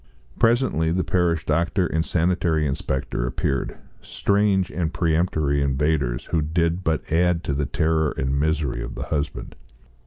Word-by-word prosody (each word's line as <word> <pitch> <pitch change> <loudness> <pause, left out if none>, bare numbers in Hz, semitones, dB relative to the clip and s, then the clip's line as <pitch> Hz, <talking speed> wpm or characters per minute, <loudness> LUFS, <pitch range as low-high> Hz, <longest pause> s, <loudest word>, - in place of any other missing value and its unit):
Presently 115 - +2
parish 85 -3 0
doctor 85 +4 +1
and 80 -1 0
sanitary 85 -2 +1
inspector 65 -3 -2
appeared, 65 +1 -2 0.2
strange 100 -2 +1
and 85 -3 -2
peremptory 80 -4 +1
invaders 70 -2 0
who 80 - +2
did 85 +3 0
but 80 -2 -1
add 85 0 +2
to 70 - -2
the 70 0 -1
terror 80 +1 +1
and 65 +1 0
misery 75 -3 0
of - - -6
the - - -4
husband. 75 -1 -3
80 Hz, 135 wpm, -23 LUFS, 70-85 Hz, 0.2 s, Presently